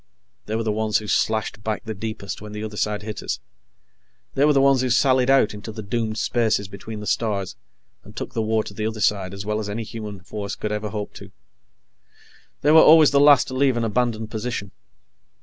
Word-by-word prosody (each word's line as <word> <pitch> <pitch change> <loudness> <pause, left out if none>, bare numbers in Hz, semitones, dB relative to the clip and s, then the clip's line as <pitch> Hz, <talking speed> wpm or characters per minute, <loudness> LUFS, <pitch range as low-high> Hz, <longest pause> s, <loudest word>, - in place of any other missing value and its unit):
They 110 - -2
were 115 - -1
the 110 - 0
ones 110 0 +1
who 105 - -5
slashed 110 0 0
back 110 -1 -2
the 110 - -4
deepest 100 -2 -6
when 105 0 -9
the 105 0 -5
other 105 -1 -6
side 105 0 -1
hit 105 0 -6
us. - - -3 0.9
They 140 - +3
were 150 - +4
the 140 - +4
ones 135 -1 +4
who 130 - 0
sallied 130 +1 +3
out 135 -6 +4
into 105 +2 -8
the 110 0 -7
doomed 110 +1 -2
spaces 110 -5 +1
between 105 +2 -8
the - - -7
stars 100 - -1 0.5
and - - -15
took - - -6
the 115 - -1
war 110 0 +1
to 100 - -9
the 105 +1 -2
other 110 0 -5
side 100 -2 +1
as 100 +1 -7
well 105 0 -1
as 105 -1 -4
any 110 +3 -3
human 105 -3 -7
force 100 +1 -5
could 105 - -4
ever 105 0 -3
hope 105 0 -5
to. - - -12 1.3
They 150 - +4
were 160 0 +9
always 155 -1 +7
the 140 - +4
last 145 -1 +6
to - - -6
leave 130 -1 +2
an 120 - 0
abandoned 115 -1 -1
position. 110 -3 -4
110 Hz, 220 wpm, -23 LUFS, 105-120 Hz, 1.3 s, were